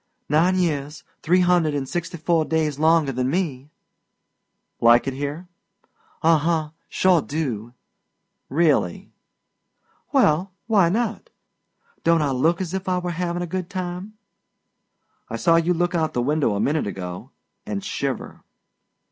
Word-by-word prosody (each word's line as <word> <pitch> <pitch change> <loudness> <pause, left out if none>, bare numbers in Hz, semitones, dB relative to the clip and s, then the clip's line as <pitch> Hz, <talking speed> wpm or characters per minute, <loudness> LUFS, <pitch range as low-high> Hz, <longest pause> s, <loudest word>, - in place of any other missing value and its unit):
"Nine 165 +5 +3
years, 150 -4 -1 0.2
three 180 +3 +3
hundred 175 -4 +3
an' 140 -2 -2
sixty 170 +4 -4
four 165 0 +1
days 155 -2 -1
longer 160 -2 +3
than 130 0 -1
me." 145 -5 -2 1.1
"Like 120 +1 +5
it 135 - -2
here?" 145 +6 -5 0.8
"Uh 165 -1 +5
huh. 160 0 0 0.2
Sure 185 -3 +3
do!" 125 -7 -4 0.7
"Really?" 145 - +1 1.0
"Well, 175 +5 +2
why 200 -7 +4
not? 225 +3 -2 0.7
Don't 165 -2 +3
I 140 - 0
look 160 +8 +1
as 185 -1 -4
if 190 0 -3
I 180 - +1
were 180 -1 -2
havin' 175 0 -2
a - - -2
good 180 +1 -4
time?" 185 +2 -5 1.1
"I - - -4
saw 165 -2 +3
you 165 +1 +2
look 175 +1 0
out 160 -2 0
the 120 - 0
window 145 -5 +1
a - - -1
minute 145 +3 0
ago 90 +4 -6 0.4
and 200 -2 -4
shiver." 140 - -4
160 Hz, 140 wpm, -23 LUFS, 140-180 Hz, 1.1 s, Like